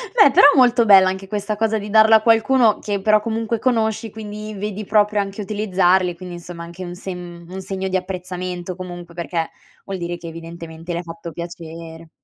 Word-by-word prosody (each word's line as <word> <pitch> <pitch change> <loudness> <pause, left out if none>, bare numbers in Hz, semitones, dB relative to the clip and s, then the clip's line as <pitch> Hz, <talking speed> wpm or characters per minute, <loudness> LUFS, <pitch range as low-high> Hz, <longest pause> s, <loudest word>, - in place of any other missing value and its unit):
Beh 420 -11 +7
però - - +7
molto 245 -3 +5
bella 190 -2 +7
anche 190 +1 -5
questa 205 +1 -3
cosa 220 +1 0
di 205 0 -7
darlo 220 +1 +6
a 220 - +7
qualcuno 230 0 +4
che 205 -2 -3
però 215 +1 +4
comunque 225 +1 -2
conosci 225 -2 0
quindi 215 0 -7
vedi 210 +1 -5
proprio 210 0 +2
anche 200 +1 -5
utilizzarli, 190 -3 +1
quindi 175 0 -8
insomma 175 0 -9
anche 170 +2 -9
un 175 - -7
se 190 +1 -7
un 175 +1 -9
segno 190 0 -4
di 190 - -2
apprezzamento 180 -1 -5
comunque 175 -2 -9
perché 170 -1 -2 0.4
vuol 195 -1 -4
dire 175 -1 -4
che 170 - -10
evidentemente 165 0 -8
le 170 - -2
hai 175 - -6
fatto 170 0 -8
piacere. 165 -1 -9
190 Hz, 190 wpm, -20 LUFS, 175-215 Hz, 0.4 s, Beh